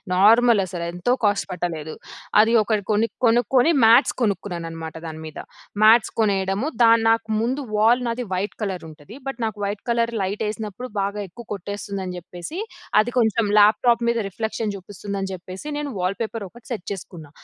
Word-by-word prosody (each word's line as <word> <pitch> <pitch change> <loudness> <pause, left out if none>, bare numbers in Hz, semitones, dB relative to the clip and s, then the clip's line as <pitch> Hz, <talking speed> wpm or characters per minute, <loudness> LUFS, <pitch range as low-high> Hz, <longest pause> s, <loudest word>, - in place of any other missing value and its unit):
Normal 225 +3 +6
అసలేంతో 175 +4 -2
cost 205 -1 +2
పట్టలేదు. 165 -3 -4 0.5
అది 225 +2 +2
ఒకటి 210 -1 0
కొన్ని 215 +2 +2 0.2
కొనుక్కొని 245 +6 +4
మాట్స్ 235 +5 +6
కొనుక్కున్నానన్నమాట 170 -6 -3
దాని 160 0 -7
మీద, 155 - -8 0.4
మాట్స్ 220 +1 +6
కొనేయడము 195 +1 0 0.2
దన్ 230 0 +5
నాకు 225 0 +1
ముందు 255 +5 -1
వాల్ 230 +4 +4
నాది 235 +1 -2
వైట్ 190 +3 -2
కలరుంటది. 175 - -7
బట్ 270 -2 -4
నాకు 220 -1 -4
వైట్ 200 0 -4
కలర్ 235 0 +1
లైటెసినప్పుడు 210 +4 -4
బాగా 200 +1 -2
ఎక్కువ 235 +7 -12
కొట్టేస్తుందని 195 -1 -5
చెప్పేసి 175 - -8 0.4
అది 235 +3 -3
కొంచెం 225 -1 +2
ల్యాప్టాప్ 225 +3 +4
మీద 235 - +1
రిఫ్లెక్షన్ 220 +1 -3
చూపిస్తుంది 200 +1 -7
అని 195 - -3
జెప్పేసి 185 +6 -8
నేను 295 -1 -3
వాల్పేపర్ 205 +4 -2
ఒకటి 235 +3 -17
సెట్ 215 -6 -4
చేసుకున్నా. 170 -5 -10
210 Hz, 150 wpm, -23 LUFS, 185-230 Hz, 0.5 s, Normal